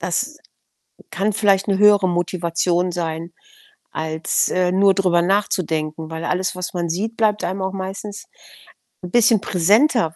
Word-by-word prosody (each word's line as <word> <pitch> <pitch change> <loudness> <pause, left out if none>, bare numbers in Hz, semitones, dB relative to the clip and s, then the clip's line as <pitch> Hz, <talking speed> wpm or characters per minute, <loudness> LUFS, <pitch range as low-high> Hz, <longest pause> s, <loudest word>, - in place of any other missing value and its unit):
Das - - -2 0.7
kann 205 +2 -1
vielleicht 200 -1 +2
'ne 195 -1 +1
höhere 205 -2 +5
Motivation 175 0 -1
sein, 165 0 -4 0.6
als, 160 0 -1
äh, 180 -1 0
nur 195 +1 +4
drüber 180 -3 +2
nachzudenken, 165 -5 -1
weil 160 +1 -6
alles, 185 +1 -1
was 180 0 -5
man 175 -1 -2
sieht, 210 +7 -3
bleibt 210 -2 +1
einem 190 +1 -3
auch 190 - -2
meistens 195 +2 -7 0.8
'n 180 - -7
bisschen 230 -3 +4
präsenter, 200 - +2
185 Hz, 140 wpm, -20 LUFS, 170-200 Hz, 0.8 s, höhere